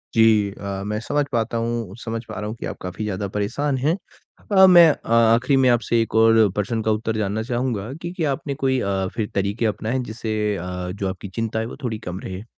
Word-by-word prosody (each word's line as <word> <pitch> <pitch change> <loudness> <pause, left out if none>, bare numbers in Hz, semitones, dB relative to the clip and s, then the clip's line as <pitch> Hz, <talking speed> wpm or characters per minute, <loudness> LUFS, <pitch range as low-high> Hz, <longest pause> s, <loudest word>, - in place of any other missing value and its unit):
जी 110 -3 +4
अ, 100 -1 -5
मैं 105 +1 -2
समझ 145 +5 0
पाता 115 -1 0
हूँ, 115 -4 -3
समझ 115 0 -4
पा 110 - -9
रहा 105 - -4
हूँ 110 - -5
कि - - -5
आप - - -5
काफ़ी 90 +3 -5
ज़्यादा 100 -1 -3
परेशान 135 +7 -1
हैं। 145 +6 +1 0.6
अ, 190 -1 +8
मैं 175 -2 +8
अ, - - -8
आखिरी 115 +4 +4
में 130 -1 +4
आपसे 120 -1 +2
एक 115 - -3
और 110 -1 +5
प्रश्न 110 +2 -1
का 110 - +1
उत्तर 110 +1 -1
जानना 105 +1 -1
चाहूँगा 120 -3 -2
कि 170 - -4
क्या 155 -4 +1
आपने 140 +1 -3
कोई 130 -1 +1
अ, 95 -3 -1
फिर 110 -3 -2
तरीके 100 +4 0
अपनाए 110 +4 -1
जिससे 110 0 -4 0.2
अ, 90 - -6 0.3
जो 100 0 -3
आपकी 95 - -6
चिंता 110 +2 -2
है 110 - -2
वो 115 - -8
थोड़ी 110 -4 -2
कम 90 +1 -5
रहे? 95 +2 -7
110 Hz, 225 wpm, -22 LUFS, 105-120 Hz, 0.6 s, अ